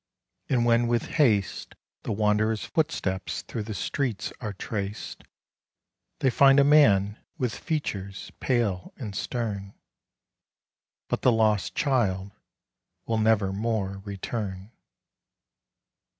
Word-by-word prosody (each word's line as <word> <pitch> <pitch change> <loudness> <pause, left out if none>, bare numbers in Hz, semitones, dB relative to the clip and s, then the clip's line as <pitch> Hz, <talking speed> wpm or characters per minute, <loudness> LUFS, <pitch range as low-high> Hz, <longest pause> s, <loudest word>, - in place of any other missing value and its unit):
And 120 -3 +2
when 120 0 +4
with 120 -1 +1 0.2
haste 105 -8 +1 0.3
The - - -4
wanderer's 105 +1 +1
footsteps 95 - -1
through 115 - -5
the 105 0 -5
streets 115 +3 -2
are 110 -3 -3
traced, 100 +1 -5 1.0
They 130 - +3
find 135 +2 +6
a - - +7
man 110 -9 +5 0.2
with 125 -6 -1
features 100 - -4
pale 110 -8 0
and 105 -6 -6
stern, 100 -5 -3 1.3
But - - -2
the 125 - +5
lost 110 -3 +2
child 100 -9 +1 0.7
will 115 -1 0
nevermore 105 -1 +1
return. 100 0 -5
110 Hz, 105 wpm, -27 LUFS, 100-120 Hz, 1.3 s, a